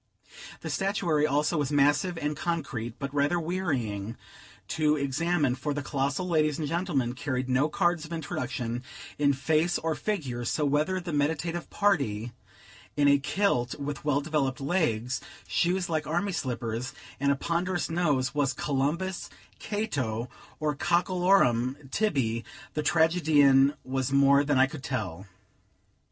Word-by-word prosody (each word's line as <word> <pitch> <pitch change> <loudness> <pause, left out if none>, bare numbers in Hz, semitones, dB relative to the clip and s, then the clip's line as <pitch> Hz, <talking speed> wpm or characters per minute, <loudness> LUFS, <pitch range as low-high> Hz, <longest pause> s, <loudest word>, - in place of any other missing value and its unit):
The - - -4
statuary 175 -6 +1
also 150 +3 +1
was 145 -1 -1
massive 145 +5 +3
and 150 -1 -2
concrete, 135 -9 -3
but 140 -1 -5
rather 145 +4 +2
wearying 130 - -2 0.5
to 155 -1 +2
examine; 145 0 +1
for 135 +3 -3
the 145 - -3
colossal 140 +6 -1
ladies 155 -4 +2
and 155 - -2
gentlemen, 155 -8 0
carried 130 -1 -2
no 130 +4 +2
cards 175 +1 +1
of 160 - -10
introduction 125 -6 -3 0.4
in 145 -1 +4
face 160 +5 +1
or 160 0 -1
figure; 145 - -3
so, 150 +5 0
whether 150 +6 +1
the 175 -2 -5
meditative 160 +4 -1
party 135 - +1 0.7
in 145 -1 +4
a 140 0 +5
kilt, 140 -6 0
with 145 0 -4
well 145 -1 +1
developed 145 -3 -1
legs, 125 -6 0 0.3
shoes 180 +1 +1
like 155 -2 -1
army 175 +5 0
slippers, 120 -4 -3 0.3
and 140 +1 +2
a - - +3
ponderous 175 +5 -1
nose, 150 -7 +1
was 145 -3 +1
Columbus, 150 +8 -1 0.3
Cato, 130 - -2 0.3
or 155 -1 0
Cockelorum 170 -7 +2
Tibby, 130 - 0 0.3
the 155 - -1
tragedian, 150 -4 +4
was 130 0 -2
more 140 +1 +5
than 145 -1 +1
I 130 - +6
could 140 +1 -8
tell. 100 -7 -4
145 Hz, 140 wpm, -28 LUFS, 130-170 Hz, 0.7 s, I